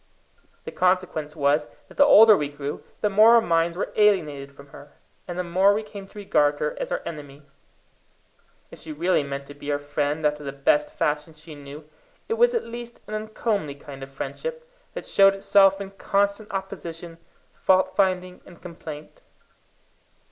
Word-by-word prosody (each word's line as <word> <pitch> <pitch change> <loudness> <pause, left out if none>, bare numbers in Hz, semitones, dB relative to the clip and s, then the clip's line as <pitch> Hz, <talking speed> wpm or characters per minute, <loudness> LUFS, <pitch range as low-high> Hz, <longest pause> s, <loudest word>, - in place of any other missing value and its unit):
The - - -7
consequence 180 -5 0
was 150 0 +1 0.2
that - - -16
the 285 - +6
older 220 -6 +8
we 145 -6 -2
grew, 145 0 -6 0.2
the 210 - +2
more 215 +4 +7
our - - +7
minds 170 -3 +1
were - - -3
alienated 155 -10 +2
from 140 0 -16
her, 145 +1 -14 0.3
and 175 -1 -6
the 180 - -1
more 190 +4 +3
we 215 - -2
came 200 -2 -10
to 210 - -17
regard 145 -7 +1
her - - -2
as - - -4
our - - -2
enemy. 145 -2 -9 1.3
If - - -12
she 160 - -9
really 170 +4 +1
meant 140 0 -5
to 145 - -11
be 145 +1 -6
our 145 - +1
friend 145 +1 -2
after 150 0 0
the 140 - -4
best 295 - +1
fashion 155 - -2
she 155 +1 -12
knew, 145 +1 -11 0.4
it - - -1
was 485 +1 +3
at 465 - 0
least 235 0 -9
an 210 - -9
uncomely 215 -7 -2
kind 140 -1 -11
of 135 - -8
friendship, 480 - -6 0.3
that - - -6
showed 195 0 +5
itself 195 0 +4
in 195 -1 -7
constant 200 +2 -1
opposition, 175 -4 -7 0.3
fault 185 0 +2
finding, 185 -2 0
and 175 - -16
complaint. 160 -3 -10
175 Hz, 175 wpm, -24 LUFS, 145-205 Hz, 1.3 s, older